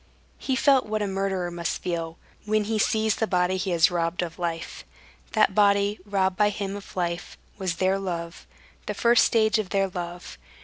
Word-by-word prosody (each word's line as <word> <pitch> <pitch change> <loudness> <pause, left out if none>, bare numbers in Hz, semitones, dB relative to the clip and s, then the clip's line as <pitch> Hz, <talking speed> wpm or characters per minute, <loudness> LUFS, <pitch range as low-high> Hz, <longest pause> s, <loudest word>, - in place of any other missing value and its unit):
He 265 - -1
felt 265 -2 +3
what 215 0 -1
a - - -1
murderer 190 -2 -2
must 170 -1 -3
feel, 165 -2 -3 0.3
when 215 0 +1
he 215 +1 -1
sees 220 0 +1
the 225 - 0
body 180 -1 +1
he 190 +1 -2
has 170 -1 +4
robbed 170 0 -1
of 170 0 -7
life. 165 -1 -4 0.5
That 215 -3 +3
body, 200 0 +3
robbed 190 -2 0
by 210 0 +4
him 200 -1 -4
of 205 - -10
life, 175 -1 -3 0.2
was 185 -3 -1
their 190 +2 +1
love, 170 -3 -5 0.4
the - - -3
first 235 0 +4
stage 220 -1 +3
of 205 -4 -3
their 195 -1 +1
love. 175 -1 -7
195 Hz, 185 wpm, -25 LUFS, 175-210 Hz, 0.5 s, has